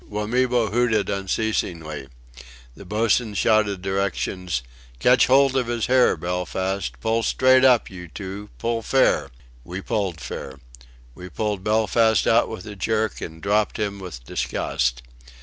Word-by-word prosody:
Wamibo 115 +2 0
hooted 115 -3 +1
unceasingly. 90 -7 -2 0.7
The 100 - -12
boatswain 110 +2 +1
shouted 105 -2 +2
directions: 95 -6 -2 0.3
"Catch 125 - +4
hold 135 0 +4
of 130 -3 +1
his 120 -2 -1
hair, 130 0 +4
Belfast; 95 +2 -3
pull 115 0 +1
straight 130 +2 +4
up, 125 -3 +5
you 90 -2 -9
two!... 100 +4 -8
Pull 115 0 -1
fair!" 135 +3 +2 0.3
We 90 +8 -6
pulled 95 -5 -2
fair. 70 -3 -7 0.6
We 90 +6 -10
pulled 105 -2 -3
Belfast 110 +1 +2
out - - +3
with 90 - -7
a 105 - -8
jerk, 110 +2 -1
and 80 -1 -8
dropped 105 +1 +1
him 100 -2 -3
with 85 -11 -8
disgust. 60 -1 -2
105 Hz, 135 wpm, -23 LUFS, 90-115 Hz, 0.7 s, up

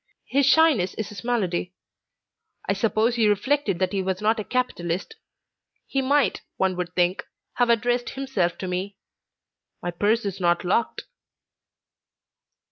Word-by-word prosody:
His 275 0 +2
shyness 280 - +4
is 215 - -4
his 210 - -9
malady. 185 -7 -1 0.9
I - - +2
suppose 220 +3 +1
he 220 -2 +4
reflected 210 0 +1
that 185 +1 0
he 195 -2 0
was 190 0 -2
not 215 +2 +1
a - - -2
capitalist. 195 - -2 0.7
He 270 - -1
might, 270 -5 +2 0.2
one 190 -1 +1
would 180 0 -4
think, 180 +1 +1 0.3
have 245 -1 +3
addressed 240 +1 +1
himself 215 -11 -1
to 190 - -5
me; 185 +2 -3 0.8
my 175 - -3
purse 210 +6 +1
is 195 -1 -3
not 175 -1 +2
locked." 200 +6 0
205 Hz, 140 wpm, -24 LUFS, 185-245 Hz, 0.9 s, shyness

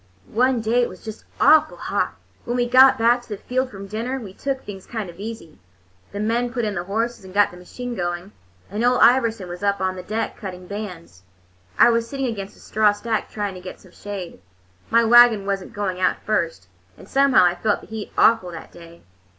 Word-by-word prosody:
One 250 +1 +2
day 230 +3 +2
it 240 - 0
was 185 +3 -13
just 220 -1 -8
awful 310 0 +5
hot. - - -2 0.3
When 240 +1 -2
we 245 0 +1
got 260 +2 +7
back 235 +2 +3
to 240 - -21
the 210 - -4
field 255 +5 -2
from 200 -4 -9
dinner, 230 +6 -3
we 205 -6 -9
took 270 +4 -4
things 195 -2 -9
kind 215 -6 -5
of 170 - -19
easy. 210 - -8 0.5
The 200 - -6
men 235 +3 0
put 240 -1 -2
in 210 - -2
the 175 -2 -4
horses 225 +3 -2
and 190 0 -12
got 205 0 +4
the 175 - -12
machine 245 +7 -7
going, 175 -1 -4 0.4
and 210 +3 -2
Ole 250 +1 +4
Iverson 230 -6 +3
was 175 +1 -8
up 200 0 +1
on 185 0 -1
the 185 - -6
deck, 215 +5 -3
cutting 185 -4 -8
bands. 180 - -8 0.6
I 240 - +7
was 230 0 0
sitting 270 -1 -3
against 205 -5 -5
a - - -19
straw 215 -1 +2
stack, 220 +1 -3
trying 205 -2 -3
to 185 - -10
get 185 - -9
some 185 - -18
shade. 190 - -8 0.5
My 230 +1 +4
wagon 235 -3 +6
was 195 -1 -1
n't - - -13
going 190 -3 -3
out 185 - +2
first, 165 - -1 0.3
and - - -14
somehow 275 -7 +4
I 175 - +3
felt 205 +4 -1
the - - -13
heat 220 -1 -7
awful 225 -5 +4
that 165 - -10
day. 170 0 -15
210 Hz, 220 wpm, -22 LUFS, 185-235 Hz, 0.6 s, got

